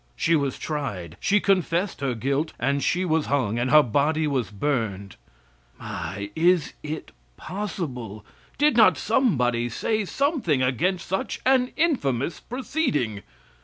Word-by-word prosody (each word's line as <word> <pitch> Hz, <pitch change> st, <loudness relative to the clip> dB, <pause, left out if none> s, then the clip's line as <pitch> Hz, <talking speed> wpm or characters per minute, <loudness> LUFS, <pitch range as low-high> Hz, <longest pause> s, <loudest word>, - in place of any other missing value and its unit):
She 165 Hz, -, +2 dB
was 140 Hz, -4 st, 0 dB
tried, 100 Hz, -, -4 dB
she 205 Hz, +1 st, +3 dB
confessed 185 Hz, -4 st, 0 dB
her 135 Hz, -3 st, -1 dB
guilt, 140 Hz, +7 st, -1 dB
and 140 Hz, 0 st, 0 dB
she 180 Hz, +1 st, +1 dB
was 160 Hz, -3 st, +1 dB
hung 120 Hz, -5 st, 0 dB
and 125 Hz, +2 st, 0 dB
her 150 Hz, +1 st, +7 dB
body 150 Hz, +6 st, +1 dB
was 130 Hz, -8 st, -1 dB
burned! 105 Hz, -4 st, -2 dB, 0.6 s
My! 100 Hz, +5 st, -6 dB
is 170 Hz, -1 st, +3 dB
it 155 Hz, +1 st, -6 dB, 0.3 s
possible? 130 Hz, -, -5 dB, 0.3 s
Did 295 Hz, -2 st, +3 dB
not 225 Hz, -2 st, +6 dB
somebody 125 Hz, -, +1 dB
say 215 Hz, -, -1 dB
something 250 Hz, -, 0 dB
against 170 Hz, +9 st, 0 dB
such 190 Hz, +1 st, -2 dB
an 255 Hz, -1 st, +3 dB
infamous 165 Hz, -, 0 dB
proceeding? 235 Hz, -, -2 dB
150 Hz, 130 wpm, -25 LUFS, 120-190 Hz, 0.6 s, her